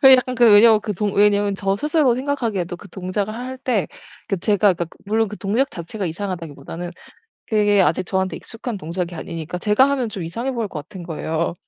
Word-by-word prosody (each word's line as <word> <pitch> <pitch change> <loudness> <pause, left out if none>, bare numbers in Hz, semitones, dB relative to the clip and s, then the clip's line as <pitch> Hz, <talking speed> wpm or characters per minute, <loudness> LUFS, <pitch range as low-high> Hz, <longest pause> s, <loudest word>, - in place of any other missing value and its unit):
그 265 -1 +9
약간 255 0 +4
그 240 - +5
왜냐면 215 +1 +7
그 215 0 -3
동 205 +2 -1
왜냐면 205 0 +3
저 195 0 0
스스로 300 0 +2
생각하기에도 230 -10 -2
그 200 - -13
동작을 195 +3 -3
할 255 +2 -6
때 240 - 0 0.4
그 195 - 0
제가 205 +1 +3
그러니까 170 0 -3 0.2
물론 220 +1 +1
그 210 - -7
동작 225 +8 0
자체가 180 +4 -5
이상하다기보다는 170 -2 -5 0.6
그게 205 -2 +3
아직 175 +2 +1
저한테 190 0 -1
익숙한 225 -1 -6
동작이 175 +1 -4
아니니까 165 0 -5
제가 210 +8 +4
하면 260 -4 0
좀 210 -4 -6
이상해 230 +11 -3
보일 230 -4 -2
것 155 - -5
같은 185 -3 -9
거예요. 165 0 -2
205 Hz, 430 characters per minute, -21 LUFS, 180-230 Hz, 0.6 s, 그